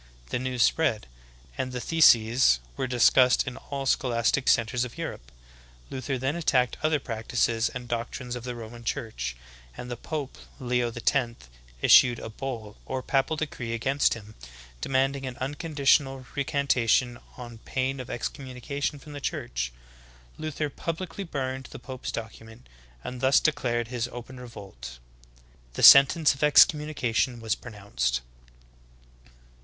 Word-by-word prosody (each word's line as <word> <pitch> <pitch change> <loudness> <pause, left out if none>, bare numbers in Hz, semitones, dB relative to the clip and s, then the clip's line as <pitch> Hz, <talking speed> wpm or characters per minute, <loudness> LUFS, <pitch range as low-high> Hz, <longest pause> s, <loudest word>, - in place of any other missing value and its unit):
The - - 0
news 125 -2 0
spread, 140 -10 +1 0.5
and 130 - -2
the 125 - -4
theses 120 - +5 0.2
v^ - - -20
ere 130 - 0
discussed 125 +1 +4
in 125 -2 -5
all 140 -1 -6
scholastic 125 0 +1
centers 120 +1 +2
of 125 - -7
Europe. - - -6 0.6
Luther 130 +1 -3
then 135 +4 -1
attacked 130 -7 +1
other 155 -1 +2
practices 115 -1 -1
and 125 -1 -7
doctrines 120 +1 -4
of 120 - -7
the 125 0 -5
Roman 120 0 -9
church, 65 - -4 0.4
and 125 - -7
the - - -2
pope, 145 +2 -6 0.2
Leo 125 -2 0
X, 120 +1 0 0.5
issued 120 -2 +7
a - - -7
"Bull" 110 -3 -6
or 130 -1 -3
papal 135 +3 +1
decree 130 -6 -4
against 135 +4 +1
him, 110 -1 -12 0.5
demanding 135 0 0
an 130 0 -7
unconditional 140 -1 +1
recantation 130 -4 +1 0.2
on 120 -2 -9
pain 130 +3 -2
of 130 - -7
excommunication 140 +3 -4
from 145 +1 -12
the 145 - -7
Church. - - -3 0.7
Luther 155 -1 -3
publicly 170 +6 -5
burned 130 -5 -4
the - - -9
pope's 130 -1 -7
document, 110 - -9 0.4
and 125 -1 -6
thus 135 +1 +5
de 155 - +3
clared 120 -4 -2
his 120 -1 -2
open 125 +1 -9
revolt. 95 - -10 0.8
The - - -3
sentence 140 +3 +8
of 135 - -12
excommunication 145 -5 +3
v/as 110 -2 -1
pronounced. 100 - -3
125 Hz, 140 wpm, -27 LUFS, 115-135 Hz, 0.8 s, sentence